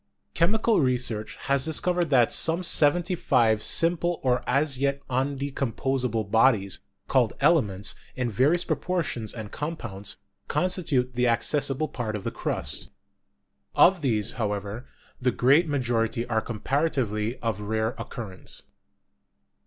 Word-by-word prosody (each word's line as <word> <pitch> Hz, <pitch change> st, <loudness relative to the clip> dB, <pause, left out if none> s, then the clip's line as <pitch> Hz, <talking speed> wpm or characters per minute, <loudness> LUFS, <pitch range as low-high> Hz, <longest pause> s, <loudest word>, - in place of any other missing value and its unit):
Chemical 215 Hz, +5 st, +2 dB
research 125 Hz, -5 st, -1 dB
has 140 Hz, -1 st, +1 dB
discovered 170 Hz, +2 st, +1 dB
that 125 Hz, -5 st, +4 dB
some 165 Hz, +3 st, +2 dB
seventy 175 Hz, +2 st, +3 dB
five 115 Hz, -10 st, +2 dB
simple 170 Hz, +1 st, +2 dB
or 125 Hz, -1 st, +1 dB
as 140 Hz, 0 st, +1 dB
yet 140 Hz, 0 st, -1 dB
undecomposable 130 Hz, -4 st, -1 dB
bodies, 110 Hz, -4 st, +3 dB, 0.3 s
called -, -, +2 dB
elements, 100 Hz, -1 st, +2 dB, 0.2 s
in 125 Hz, -1 st, -1 dB
various 140 Hz, -, +2 dB
proportions 155 Hz, -, -2 dB
and 110 Hz, -4 st, -7 dB
compounds, 120 Hz, -11 st, -5 dB, 0.3 s
consti 180 Hz, -1 st, 0 dB
tute 125 Hz, -2 st, +1 dB
the 125 Hz, 0 st, +1 dB
accessible 135 Hz, +5 st, +1 dB
part 115 Hz, -6 st, -4 dB
of 105 Hz, -, -5 dB
the -, -, -3 dB
crust. -, -, -2 dB, 0.9 s
Of 185 Hz, -2 st, +5 dB
these, 110 Hz, -7 st, +1 dB
however, 105 Hz, +3 st, -3 dB, 0.3 s
the 125 Hz, -, +2 dB
great 140 Hz, +8 st, +3 dB
majority 120 Hz, -5 st, 0 dB
are 110 Hz, -2 st, 0 dB
comparatively 120 Hz, -2 st, -1 dB
of 115 Hz, -4 st, -3 dB
rare 110 Hz, +2 st, -1 dB
occurrence. 105 Hz, -7 st, -7 dB
130 Hz, 120 wpm, -26 LUFS, 110-150 Hz, 0.9 s, Of